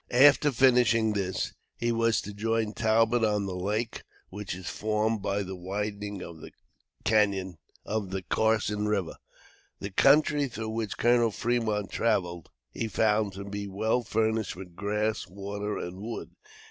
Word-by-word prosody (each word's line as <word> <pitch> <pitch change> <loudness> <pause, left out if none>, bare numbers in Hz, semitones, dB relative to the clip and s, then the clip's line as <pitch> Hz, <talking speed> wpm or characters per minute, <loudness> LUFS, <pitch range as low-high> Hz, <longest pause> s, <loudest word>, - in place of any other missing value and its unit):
After 145 +3 +6
finishing 120 -3 +4
this, 95 -2 -2 0.2
he 120 0 0
was 115 -1 +2
to 105 - -8
join 110 +1 -1
Talbot 115 +2 +2
on 105 -2 +2
the 95 - -4
lake 105 +5 -2 0.3
which 100 -1 -5
is 95 -1 -8
formed 110 0 0
by 100 +1 -1
the 95 0 -6
widening 100 +1 -4
of 85 -2 -10
the - - -10 1.8
Carson 105 -1 +1
River. 100 -6 -1 0.6
The 100 - -5
country 145 +5 +4
through 110 -3 -5
which 110 -2 -3
Colonel 120 -1 +4
Fremont 110 -3 -1
traveled, 90 -8 0 0.2
he 115 - -3
found 105 -1 +1
to 100 +1 -6
be 100 0 -5
well 110 +5 0
furnished 110 -2 0
with 90 -2 -10
grass, 105 +2 -1
water 100 +2 -4
and 90 +2 -6
wood. 115 +2 -6
105 Hz, 140 wpm, -28 LUFS, 100-115 Hz, 1.8 s, After